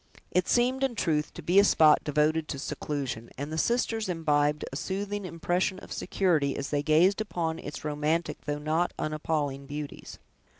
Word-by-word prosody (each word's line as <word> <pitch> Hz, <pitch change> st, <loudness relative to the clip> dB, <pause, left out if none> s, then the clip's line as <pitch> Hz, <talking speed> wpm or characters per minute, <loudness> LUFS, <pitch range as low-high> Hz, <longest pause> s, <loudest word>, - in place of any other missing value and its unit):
It 180 Hz, 0 st, +2 dB
seemed, 255 Hz, +2 st, +2 dB
in 265 Hz, -3 st, 0 dB
truth, 155 Hz, -7 st, 0 dB
to -, -, -8 dB
be 180 Hz, +3 st, +5 dB
a -, -, +7 dB
spot 155 Hz, -6 st, +5 dB
devoted 155 Hz, +1 st, +1 dB
to 140 Hz, -, -4 dB
seclusion, 135 Hz, -5 st, -4 dB
and 145 Hz, +3 st, -4 dB
the -, -, -2 dB
sisters 225 Hz, -2 st, 0 dB
imbibed 150 Hz, -3 st, +1 dB
a -, -, -4 dB
soothing 200 Hz, +5 st, -3 dB
impression 180 Hz, +2 st, -1 dB
of -, -, -9 dB
security, 160 Hz, -8 st, +1 dB
as 140 Hz, -, -4 dB
they 145 Hz, -1 st, +1 dB
gazed 170 Hz, +7 st, +4 dB
upon 165 Hz, -6 st, -2 dB
its 150 Hz, -, -7 dB
romantic 150 Hz, +3 st, -1 dB
though 145 Hz, 0 st, -1 dB
not 155 Hz, +4 st, 0 dB
unappalling 150 Hz, -3 st, -2 dB
beauties. 145 Hz, 0 st, -7 dB
155 Hz, 170 wpm, -28 LUFS, 150-185 Hz, -, a